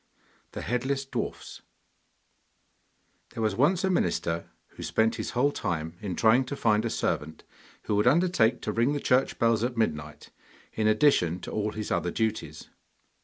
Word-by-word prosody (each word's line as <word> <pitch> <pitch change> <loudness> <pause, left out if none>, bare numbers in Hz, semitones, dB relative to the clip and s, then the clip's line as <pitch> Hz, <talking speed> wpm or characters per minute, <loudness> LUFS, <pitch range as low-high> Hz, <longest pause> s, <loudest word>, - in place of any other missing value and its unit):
THE - - -5
HEADLESS 135 +3 -1
DWARFS 135 - -5 1.7
There 115 - -2
was 110 -2 +1
once 170 - +2
a 190 - +2
minister 85 - -1 0.2
who - - -13
spent 110 +1 +1
his - - -3
whole 140 +4 +3
time 80 - -3
in 95 -4 -4
trying 115 +6 +4
to 140 - -5
find 110 -5 +2
a - - 0
servant 80 -6 -2 0.4
who 105 - -1
would 105 +3 +2
undertake 155 -6 +3
to - - -1
ring 120 +5 +1
the 145 - -1
church 130 -1 +1
bells 115 -2 +2
at 120 0 -2
midnight, 75 -8 -3 0.4
in 110 -1 0
addition 110 - +3
to - - -7
all 105 0 -2
his 110 -1 -5
other 90 - 0
duties. 110 +3 -3
110 Hz, 165 wpm, -27 LUFS, 105-130 Hz, 1.7 s, trying